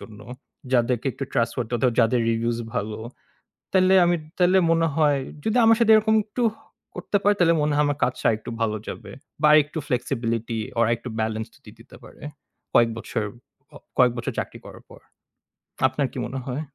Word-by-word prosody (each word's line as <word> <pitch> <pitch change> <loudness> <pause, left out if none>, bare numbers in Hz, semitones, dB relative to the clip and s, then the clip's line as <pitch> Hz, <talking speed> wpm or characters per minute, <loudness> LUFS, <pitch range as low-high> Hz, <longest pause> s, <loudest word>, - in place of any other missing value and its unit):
জন্য। 105 -2 -12 0.5
যাদেরকে 120 +1 +1
একটু 135 - -5
ট্রাস্ট 115 -2 0 0.5
যাদের 120 +1 +2
রিভিউজ 115 +1 -1 0.2
ভালো। 110 -2 -3 0.8
তাইলে 190 0 +4
আমি, 175 0 +2 0.2
তাইলে 180 +1 +4
মনে 165 0 +2
হয় 145 -3 +3 0.3
যদি 220 +3 +1
আমার 225 0 +5
সাথে 225 -1 +4
এরকম 220 0 +3
একটু 220 +3 -3 0.5
করতে 205 - -1
পারি 205 +1 +4
তাইলে 170 -1 +4
মনে 150 0 +1
হয় 150 - +3
আমার 145 0 -1
কাজটা 125 - -2
আরেকটু 110 +1 -3
ভালো 110 -1 0
যাবে। 105 -3 -8 0.3
বা - - +3
আরেকটু 150 +1 +3
flexibility 115 -4 -2
বা 115 - -2
আরেকটু 120 +1 -2
বেলেন্স 110 0 -2 0.2
দিয়ে - - -14
দিতে - - -16
পারে। - - -15 0.5
কয়েক 115 -1 +5
বছর 110 - -3 0.7
কয়েক 125 -1 +5
বছর 120 - -3
চাকরি - - -6
করার - - -12
পর। - - -14 0.9
আপনার 130 +1 -1
কি - - -8
মনে 135 +2 -5
হয়? 135 +3 -4
130 Hz, 170 wpm, -23 LUFS, 115-165 Hz, 0.9 s, আমার